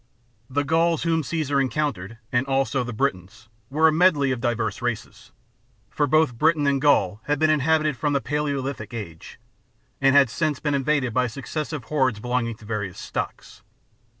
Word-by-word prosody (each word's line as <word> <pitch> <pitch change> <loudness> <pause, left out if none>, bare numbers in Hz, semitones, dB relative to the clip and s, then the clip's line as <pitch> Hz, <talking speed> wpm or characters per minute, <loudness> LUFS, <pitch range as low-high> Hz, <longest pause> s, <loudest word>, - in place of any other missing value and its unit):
The 145 +2 0
Gauls 165 +2 +1
whom 165 -1 +1
Caesar 145 -2 0
encountered, 125 -6 -2
and 125 +2 +1
also 135 -1 +1
the 125 - -5
Britons, 105 -4 -3 0.2
were 155 +4 +4
a - - +4
medley 155 -5 +3
of 125 -2 -2
divers 120 -3 -1
races; 115 -1 -5 0.6
for 145 - 0
both 150 -5 +2
Britain 155 -1 +3
and 140 -1 +1
Gaul 110 -8 +2
had 145 0 0
been 155 +2 +3
inhabited 155 0 +2
from 145 +3 -1
the 140 - +2
Palaeolithic 140 -6 -3
Age, 85 -8 -8 0.6
and 135 0 +4
had 135 -5 +5
since 155 -2 -1
been 150 -2 -1
invaded 140 -3 0
by 125 +1 +2
successive 145 +4 -5
hordes 130 -5 0
belonging 120 0 -1
to 110 - -16
various 105 -4 -4
stocks. - - -6
135 Hz, 165 wpm, -24 LUFS, 120-150 Hz, 0.6 s, had